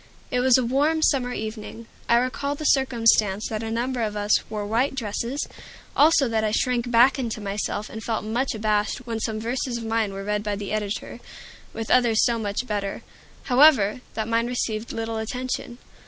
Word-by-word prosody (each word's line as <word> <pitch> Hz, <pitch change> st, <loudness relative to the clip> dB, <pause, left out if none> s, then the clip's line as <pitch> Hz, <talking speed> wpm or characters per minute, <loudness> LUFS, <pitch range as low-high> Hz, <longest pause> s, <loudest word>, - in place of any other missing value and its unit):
It 250 Hz, -, +1 dB
was 255 Hz, 0 st, +5 dB
a 255 Hz, -, 0 dB
warm, 295 Hz, +6 st, +1 dB
summer 255 Hz, -5 st, +2 dB
evening. 220 Hz, 0 st, -6 dB, 0.2 s
I 235 Hz, -, +6 dB
recall 255 Hz, +3 st, -1 dB
the 310 Hz, -, -6 dB
circumstance 230 Hz, -7 st, +3 dB
that 215 Hz, -1 st, -3 dB
a 225 Hz, -, -4 dB
number 240 Hz, +2 st, -2 dB
of 210 Hz, -2 st, -2 dB
us 205 Hz, +1 st, +3 dB
wore 210 Hz, -1 st, -3 dB
white 235 Hz, +6 st, 0 dB
dresses; 235 Hz, +3 st, -3 dB, 0.5 s
also 300 Hz, -2 st, +5 dB
that 225 Hz, -1 st, 0 dB
I 215 Hz, -, +1 dB
shrank 245 Hz, +2 st, 0 dB
back 245 Hz, +3 st, +5 dB
into 230 Hz, -4 st, -3 dB
myself, 205 Hz, +1 st, -3 dB
and 220 Hz, 0 st, -8 dB
felt 225 Hz, -2 st, -2 dB
much 235 Hz, +3 st, -1 dB
abashed 215 Hz, +2 st, -1 dB
when 230 Hz, -2 st, -3 dB
some 220 Hz, -1 st, -2 dB
verses 240 Hz, +2 st, -2 dB
of 230 Hz, -, -6 dB
mine 225 Hz, -2 st, 0 dB
were 195 Hz, 0 st, -6 dB
read 210 Hz, +1 st, -1 dB
by 210 Hz, -1 st, -2 dB
the 200 Hz, -1 st, -6 dB
editor, 210 Hz, -1 st, -3 dB, 0.5 s
with 225 Hz, -1 st, -5 dB
others 240 Hz, -3 st, +4 dB
so 235 Hz, -1 st, +1 dB
much 205 Hz, +3 st, -2 dB
better, 205 Hz, -4 st, -3 dB, 0.4 s
however, 255 Hz, -4 st, +5 dB
that 220 Hz, -1 st, -2 dB
mine 230 Hz, +1 st, +1 dB
received 230 Hz, -2 st, -2 dB
little 225 Hz, 0 st, -3 dB
attention. 240 Hz, +2 st, -4 dB
230 Hz, 185 wpm, -24 LUFS, 215-250 Hz, 0.5 s, I